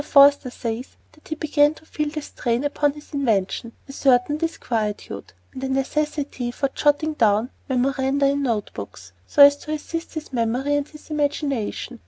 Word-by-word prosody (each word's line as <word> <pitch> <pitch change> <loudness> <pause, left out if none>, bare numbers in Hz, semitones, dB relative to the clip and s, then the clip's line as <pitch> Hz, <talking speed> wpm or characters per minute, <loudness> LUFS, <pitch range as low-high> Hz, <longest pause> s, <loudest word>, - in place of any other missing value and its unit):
Forster 280 -2 +6
says 235 0 -5 0.2
that 305 - -20
he 315 - -3
began 300 -1 +3
to 315 - -17
feel 300 -1 -2
a 305 - -2
strain 240 -1 -2
upon 290 0 +1
his 295 +1 -14
invention, 230 -4 0
a - - -8
certain 270 +1 +3
disquietude, 230 -10 -3 0.2
and 265 -1 -7
a 265 - -1
necessity 275 -1 -1
for 275 +3 -1
jotting 295 +3 +1
down 225 -2 +2 0.2
memoranda 265 +2 +1
in 280 +1 +2
note 230 -6 -1
books, 95 -3 -9
so 285 - +7
as 285 0 +8
to 305 +1 -5
assist 330 +2 -5
his 310 -3 -6
memory 245 +4 0
and 290 0 -1
his 305 +1 -14
imagination. 280 -5 -2
280 Hz, 170 wpm, -23 LUFS, 245-295 Hz, 0.2 s, as